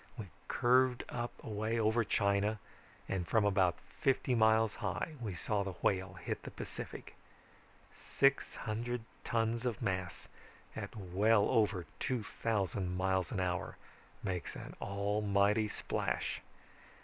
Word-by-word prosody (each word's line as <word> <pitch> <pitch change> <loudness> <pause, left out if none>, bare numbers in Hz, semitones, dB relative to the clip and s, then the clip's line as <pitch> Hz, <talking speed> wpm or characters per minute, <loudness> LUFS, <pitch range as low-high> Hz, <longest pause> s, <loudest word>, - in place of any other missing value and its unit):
We 105 -5 -6 0.2
curved 125 0 +3 0.4
away 110 +1 -1
up 110 - +2
over 115 +2 +3
China 100 +1 +2 0.5
and 90 -3 -2
from 110 +2 +3
about 95 -3 +3 0.2
fifty 135 -2 +2
miles 110 -1 +4
high 105 - -2
we 105 -6 -3
saw 105 +3 0
the 100 -1 -3
Whale 95 -1 +1
hit - - -4
the - - -7
Pacific. - - -7 0.8
Six 140 0 +2
hundred 120 +2 -2 0.2
tons 115 +1 0
of 120 -4 -1
mass 95 -2 -2 0.5
at - - -5
well 100 +2 +3
over 100 -5 +2
two 125 -4 -1
thousand 95 -5 -1
miles 95 -2 +1
an 100 - -1
hour 90 -2 -1 0.5
make 90 -3 -3
an - - -7
almighty 100 +1 +2
splash. - - -2
105 Hz, 125 wpm, -34 LUFS, 95-115 Hz, 0.8 s, miles